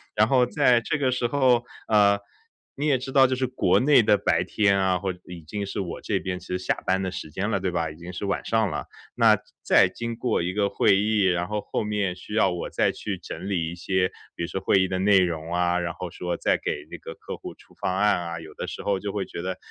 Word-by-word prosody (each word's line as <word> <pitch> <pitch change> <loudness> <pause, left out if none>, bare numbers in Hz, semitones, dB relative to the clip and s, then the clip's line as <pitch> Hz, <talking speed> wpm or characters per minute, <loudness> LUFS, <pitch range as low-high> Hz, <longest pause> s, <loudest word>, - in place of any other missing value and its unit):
然 110 +1 +4
后 125 -1 +4
在 120 0 +3
这 150 - -1
个 130 -3 +1
时 125 -1 -1
候， 125 -3 +3 0.3
呃， 100 -1 +5 0.6
你 145 +2 -1
也 135 -3 +4
知 135 +2 -6
道 135 -1 +6
就 130 - 0
是 130 0 -1
国 130 - +2
内 140 -2 +6
的 105 - +4
白 80 0 +1
天 100 -1 +2
啊， 95 -1 +2
或 95 -2 -2
已 90 -2 -9
经 100 +6 -5
是 100 - -5
我 90 -3 -4
这 - - -1
边 90 -1 -4
是 90 - -4
下 - - 0
班 95 +1 +1
的 95 -1 -2
时 80 - -6
间 100 +6 -2
了， 100 - 0
对 90 -1 -1
吧， 85 -2 -1
已 - - -12
经 85 +1 -8
是 100 - -4
晚 100 - -1
上 110 -3 +1
了。 - - -4 0.3
那 - - +5 0.3
再 - - +5
经 115 -1 -5
过 120 -5 0
一 90 +2 -2
个 100 -1 +1
会 95 - +3
议， 105 0 +2
然 90 -1 +1
后 105 -1 -2
后 - - -3
面 105 -3 -1
需 100 +3 -10
要 100 -4 +3
我 90 - -4
再 - - +1
去 - - -5
整 - - -7
理 85 -4 -1
一 - - -7
些 90 +1 0 0.3
比 85 - -4
如 - - -2
说 95 - -3
会 95 - +3
议 95 - +2
的 95 - -2
内 100 0 +5
容 85 -2 -1
啊， 90 0 +2
然 85 -1 -3
后 90 -1 -6
说 90 -1 -3
再 - - +1
给 - - -3
这 - - -7
个 - - -9
客 - - -8
户 - - -8
出 - - -21
方 95 - -2
案 105 -2 +3
啊， 85 -1 -5
有 80 -1 -11
的 - - -5
时 - - -6
候 100 -2 0
就 100 0 -4
会 100 -2 -1
觉 85 - -7
得， 95 +1 -3
95 Hz, 285 characters per minute, -25 LUFS, 90-110 Hz, 0.6 s, 道